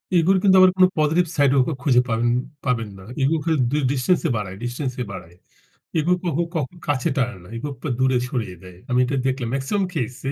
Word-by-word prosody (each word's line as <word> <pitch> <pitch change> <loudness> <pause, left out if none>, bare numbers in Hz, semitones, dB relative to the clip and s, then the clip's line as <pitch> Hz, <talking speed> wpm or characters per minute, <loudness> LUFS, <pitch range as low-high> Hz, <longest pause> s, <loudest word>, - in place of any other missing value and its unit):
ego 170 +2 +4
র - - +3
কিন্তু 190 -2 +5
আবার 185 0 +7
কোনো 185 0 +7
positive 160 +4 +2
side 140 -2 +4
ও - - +6 0.2
খুঁজে 125 -4 +4
পাবেন 115 +1 +1 0.4
পাবেন 115 -4 0
না। 95 - -12 0.2
Ego 150 +4 +3
খালি 160 0 +1
ডি 150 - +1
distance 140 +7 +1
এ - - -1
বাড়ায় 95 -3 -5
distance 125 +2 -3
এ - - 0
বাড়ায়, 85 -3 -10 0.6
Ego 170 +4 +2
কখো 170 -1 0
কখো 155 +1 -2
কাছে 135 -4 0
টানে 125 -6 0
না। 90 - -14
Ego 135 +6 -4
আপনার 130 +1 -4
দূরে 130 0 +3
সরিয়ে 110 -9 -3
দেয়, 90 -1 -12
আমি 125 - +2
এটা 135 +2 -2
দেখলাম। 130 -3 -1
maximum 145 +9 0
case 125 -5 -3
135 Hz, 215 wpm, -22 LUFS, 120-155 Hz, 0.6 s, আবার